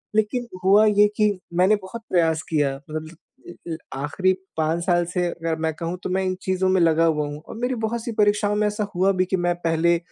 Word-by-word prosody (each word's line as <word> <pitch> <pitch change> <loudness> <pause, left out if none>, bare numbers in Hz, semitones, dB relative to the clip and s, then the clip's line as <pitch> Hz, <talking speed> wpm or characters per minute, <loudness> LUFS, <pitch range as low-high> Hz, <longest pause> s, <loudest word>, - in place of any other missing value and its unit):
लेकिन 235 +3 0 0.2
हुआ 205 +3 +6
ये 210 0 +5
कि 210 -2 +2 0.2
मैंने 185 +4 +4
बहुत 205 +3 -8
प्रयास 165 -3 +2
किया, 145 -4 +1
मतलब 155 +1 -6 0.3
अ 170 -1 -10
अ, - - -2 0.2
आख़िरी 165 +7 +1 0.3
5 160 +2 0
साल 175 -2 +3
से 180 +1 -1
अगर 165 -1 -3
मैं 160 -1 0
कहूँ, 170 +2 -3
तो - - -3
मैं 190 +1 0
इन 185 0 -1
चीज़ों 185 0 0
में 185 -1 +3
लगा 165 0 +4
हुआ 150 -2 +1
हूँ, 145 +1 -7
और - - -8
मेरी 245 +1 -1
बहुत-सी 230 +1 -2
परीक्षाओं 205 0 +3
में 210 0 +1
ऐसा 210 +1 -2
हुआ 190 +2 +3
भी 185 - +4
कि 190 - -1
मैं 175 0 +1
पहले 165 +1 +2
180 Hz, 220 wpm, -23 LUFS, 165-205 Hz, 0.3 s, हुआ